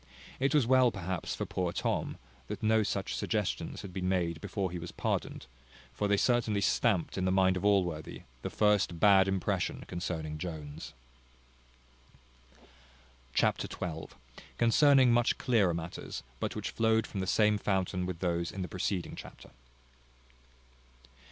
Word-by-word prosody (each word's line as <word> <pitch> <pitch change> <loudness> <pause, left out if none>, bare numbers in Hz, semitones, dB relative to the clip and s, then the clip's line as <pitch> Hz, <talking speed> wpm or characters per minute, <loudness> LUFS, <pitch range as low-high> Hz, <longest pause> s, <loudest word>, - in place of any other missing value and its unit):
It 135 +3 +2
was 145 -5 +4
well 130 0 +5
perhaps 95 -4 -4
for - - -3
poor 90 -2 -2
Tom, - - -2 0.3
that - - -6
no 110 0 +4
such 100 -2 -2
suggestions 105 -3 -2
had 95 - -8
been 90 0 -2
made 85 -3 0
before 95 -4 -2
he 90 - -4
was 85 +1 -7
pardoned; - - -3 0.5
for 100 - -1
they 100 0 +3
certainly 115 -3 +2
stamped 100 -2 +1
in 95 - 0
the 95 - +2
mind 95 0 +3
of 90 - -3
Allworthy 90 -6 0 0.2
the - - -3
first 105 -5 +2
bad 95 -1 +6
impression 95 -2 -1
concerning 80 -3 -4
Jones. 80 -4 -7 2.4
Chapter - - +2
xii. 80 -3 -5 0.5
Containing 130 +2 +5
much 120 0 +2
clearer 110 -9 +2
matters; 85 +1 -6 0.2
but - - -3
which - - -3
flowed 110 0 +2
from 100 - -6
the 95 - -2
same 105 +2 +3
fountain 95 -2 -1
with 90 -2 -5
those 85 -2 -1
in 95 - -4
the - - -4
preceding 90 0 -3
chapter. - - -11
95 Hz, 145 wpm, -31 LUFS, 85-105 Hz, 2.4 s, bad